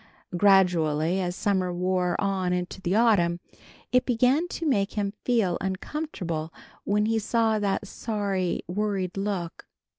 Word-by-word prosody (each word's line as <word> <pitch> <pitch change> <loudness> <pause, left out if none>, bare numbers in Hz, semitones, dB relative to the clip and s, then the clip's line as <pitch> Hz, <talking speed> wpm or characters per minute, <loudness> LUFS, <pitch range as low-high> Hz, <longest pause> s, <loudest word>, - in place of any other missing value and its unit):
Gradually 175 -3 +3
as 180 -1 -2
summer 190 -3 0
wore 180 0 0
on 190 -3 0
into 180 +1 -3
the 185 +1 0
autumn, 195 -7 +3 0.5
it 250 0 +4
began 255 +7 +2
to 340 - -5
make 200 -8 +1
him 200 -1 -2
feel 220 -8 +1
uncomfortable 185 - -4 0.3
when 210 +1 +2
he 225 0 +1
saw 220 0 +1
that 205 0 -1
sorry, 200 -5 -2
worried 190 -1 -2
look. 195 -4 -4
195 Hz, 130 wpm, -26 LUFS, 180-215 Hz, 0.5 s, it